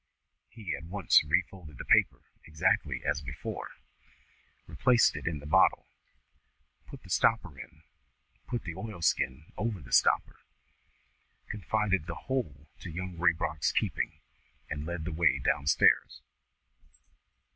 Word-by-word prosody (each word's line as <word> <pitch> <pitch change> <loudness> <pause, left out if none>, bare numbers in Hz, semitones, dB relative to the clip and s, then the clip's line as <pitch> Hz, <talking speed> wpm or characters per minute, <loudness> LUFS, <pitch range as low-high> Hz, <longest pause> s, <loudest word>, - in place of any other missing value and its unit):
He 100 -10 -5
at 75 - -10
once 95 +1 +3
refolded 80 -7 -2
the - - -7
paper - - +3 0.3
exactly 75 0 0
as 75 - 0
before, 65 -1 -6 1.0
replaced 120 - +3
it - - -6
in 80 -2 -1
the 75 - -11
bottle, 75 - +3 1.0
put 140 - -11
the 95 - -15
stopper 105 -5 +2
in, 80 -2 -12 0.6
put 120 - -3
the 85 - -5
oilskin 80 - -2
over 105 -3 -2
the 65 -5 -14
stopper, - - +3 1.1
confided 100 -4 -1
the 85 - -5
whole 75 - -4
to - - -8
Young 90 +2 -6
Raybrock's 80 -4 +1
keeping, - - -2 0.5
and 75 +1 -4
led 85 -2 -4
the 85 - -4
way 80 -5 +3
down 70 +1 -1
stairs. 70 - +3
85 Hz, 125 wpm, -30 LUFS, 75-100 Hz, 1.1 s, once